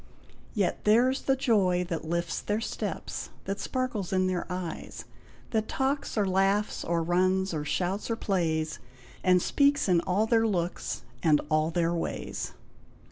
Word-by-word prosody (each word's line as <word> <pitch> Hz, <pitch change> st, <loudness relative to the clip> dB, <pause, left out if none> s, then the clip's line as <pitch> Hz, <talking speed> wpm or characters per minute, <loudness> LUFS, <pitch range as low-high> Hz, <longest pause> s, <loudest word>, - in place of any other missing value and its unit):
Yet 200 Hz, -4 st, 0 dB
theirs 245 Hz, +5 st, +4 dB
the 270 Hz, -, +2 dB
joy 195 Hz, -9 st, +2 dB
That 165 Hz, -2 st, -3 dB
lifts 170 Hz, +1 st, -1 dB
their 210 Hz, +1 st, -1 dB
steps, 225 Hz, -, -4 dB, 0.2 s
that 195 Hz, +1 st, -3 dB
sparkles 255 Hz, -8 st, -2 dB
in 185 Hz, -1 st, +2 dB
their 185 Hz, -1 st, -1 dB
eyes; 180 Hz, -2 st, -5 dB, 0.5 s
That 220 Hz, -1 st, 0 dB
talks 270 Hz, -1 st, -1 dB
or 205 Hz, -, +3 dB
laughs, 195 Hz, +2 st, +1 dB
or 170 Hz, 0 st, 0 dB
runs, 185 Hz, +2 st, +2 dB
or 150 Hz, -2 st, -2 dB
shouts, 185 Hz, +8 st, -1 dB
or 230 Hz, -, +1 dB
plays, 160 Hz, -7 st, -1 dB, 0.4 s
And 180 Hz, -1 st, +4 dB
speaks 285 Hz, -3 st, +3 dB
in 175 Hz, -3 st, +4 dB
all 190 Hz, +5 st, +1 dB
their 225 Hz, 0 st, +3 dB
looks, 175 Hz, -4 st, -2 dB, 0.2 s
and 150 Hz, -3 st, +4 dB
all 155 Hz, +1 st, +3 dB
their 170 Hz, 0 st, +1 dB
ways. 170 Hz, -, -3 dB
185 Hz, 150 wpm, -28 LUFS, 170-215 Hz, 0.5 s, theirs